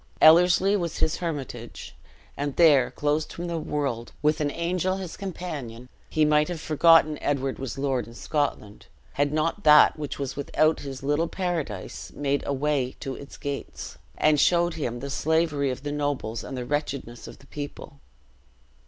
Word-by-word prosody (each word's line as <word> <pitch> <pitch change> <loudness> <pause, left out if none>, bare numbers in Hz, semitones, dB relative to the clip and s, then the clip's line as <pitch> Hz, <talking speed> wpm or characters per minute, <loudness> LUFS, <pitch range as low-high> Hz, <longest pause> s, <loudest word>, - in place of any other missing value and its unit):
Ellerslie 180 +5 +6
was 170 -5 -2
his 160 - +1
hermitage; 135 -8 -6 0.4
and 145 -1 -3
there, 145 -7 +5
closed 150 +1 -1
from 175 - -6
the 170 -1 -2
world, 140 -6 -3
with 150 +1 +2
an 145 - +1
angel 180 +4 -1
his 185 -3 -6
companion, 150 - -6 0.2
he 155 -1 +2
might 150 0 +3
have 175 -2 -4
forgotten 155 0 +4
Edward 135 -2 -1
was 135 -2 -5
lord 135 -2 -1
in 115 - -13
Scotland, 130 -8 -3 0.3
had 145 0 +1
not 165 +6 -1
that 150 0 +7
which 145 -2 -4
was 140 -2 -4
without 155 +2 +1
his 135 -1 -7
little 145 +4 +1
paradise 165 - -4
made 140 0 -1
a 140 - 0
way 140 -2 0
to 135 - -4
its 140 +1 -10
gates, 140 - -6 0.2
and 155 -1 +3
showed 175 +2 +3
him 120 -7 -4
the 140 0 -5
slavery 155 -2 +1
of 130 +1 -5
the 145 - -3
nobles 145 -6 -2
and 135 - -6
the 125 - -4
wretchedness 140 -4 -3
of - - -11
the - - -19
people. 145 0 -8
145 Hz, 170 wpm, -26 LUFS, 135-160 Hz, 0.4 s, that